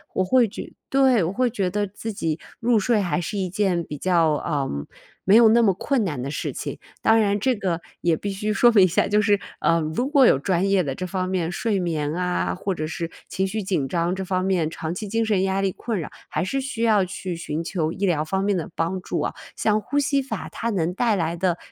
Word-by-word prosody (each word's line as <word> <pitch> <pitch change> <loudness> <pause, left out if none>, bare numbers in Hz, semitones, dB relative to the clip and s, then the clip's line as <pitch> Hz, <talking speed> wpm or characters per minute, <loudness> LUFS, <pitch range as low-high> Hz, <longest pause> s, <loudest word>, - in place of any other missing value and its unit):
我 185 - +2
会 250 +5 +4
觉 225 - -8 0.2
对， 265 -6 +4
我 165 - -1
会 250 +4 +1
觉 195 -4 -1
得 205 +2 -1
自 210 +3 -6
己 165 -6 -2 0.2
入 235 -1 +3
睡 215 +1 +2
还 180 -1 0
是 205 +5 -4
一 185 -2 -1
件 190 -3 +1
比 150 - -6
较， 165 -1 +2
呃， 145 -2 -1 0.5
没 195 - +5
有 235 - +8
那 235 +1 +5
么 200 -4 +4
困 245 +6 0
难 150 -10 -3
的 135 - -4
事 145 - -3
情。 - - -5 0.2
当 225 - +4
然 205 -1 +2
这 255 +5 +1
个 180 -5 -2 0.2
也 170 -2 +2
必 205 - -4
须 210 +2 -2
说 240 +4 +5
明 200 -4 +7
一 185 - +6
下 170 - +1
就 210 +1 +3
是，， 205 -1 +3 0.2
呃， 165 - +3
如 160 +12 -1
果 280 -2 +5
有 - - +5
专 185 +5 0
业 195 -2 +3
的 140 -4 -2
这 185 +7 -5
方 185 0 -2
面 180 -3 -1
睡 205 +2 0
眠 155 -4 -1
啊， 180 +1 -1
或 195 +1 -3
者 155 - -3
是 165 +1 -4 0.2
情 190 +1 -1
绪 210 +2 -3
紧 180 -8 -1
张， 170 +2 0
这 190 - -4
方 185 0 -1
面 180 -5 +1
长 160 0 -4
期 210 +4 -5
精 225 +3 0
神 210 -4 +2
压 195 0 0
力 195 - +1
困 220 0 -3
扰， 155 - -5 0.2
还 - - -1
是 270 +9 -1
需 250 -4 -3
要 215 -4 +4
去 185 -1 -5
寻 165 -1 -4
求 165 -2 -1
医 195 +4 -2
疗 165 -5 +1
方 190 +5 -1
面 200 0 +1
的 170 - -3
帮 175 +3 -1
助 - - -3
啊。 - - -2 0.2
像 215 0 +1
呼 255 +7 -3
吸 280 -1 +2
法 260 -4 -5
它 230 - -3
能 180 -5 0
带 225 +2 +1
来 170 -2 -1
的， 175 0 0
190 Hz, 265 characters per minute, -23 LUFS, 170-215 Hz, 0.5 s, 有